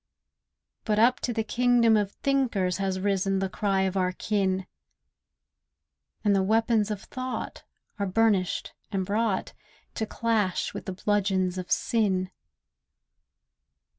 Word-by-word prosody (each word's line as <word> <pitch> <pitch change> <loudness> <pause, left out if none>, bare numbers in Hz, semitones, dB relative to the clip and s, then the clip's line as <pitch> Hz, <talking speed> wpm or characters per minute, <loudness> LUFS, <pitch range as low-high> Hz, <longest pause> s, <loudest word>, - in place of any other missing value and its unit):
But 210 -2 0
up 240 +4 +4
to 245 - -2
the 225 -1 -1
Kingdom 240 -1 +3
of 205 -2 +1
Thinkers 230 -11 0
Has 190 -1 -1
risen 195 0 +1
the 190 0 -1
cry 195 -1 0
of 190 0 0
our 185 -1 +1
kin; 190 -2 0 1.6
And 205 -2 +3
the 195 - +3
weapons 220 +1 +2
of 210 -2 -4
thought 255 0 -5 0.4
are 200 - 0
burnished 195 -2 +1 0.2
and 190 -2 -1
brought 210 0 -1 0.4
To 220 - -3
clash 220 -6 0
with - - -7
the 190 - -3
bludgeons 190 -2 0
of 180 - -7
sin. 190 -5 +1
200 Hz, 130 wpm, -27 LUFS, 190-225 Hz, 1.6 s, up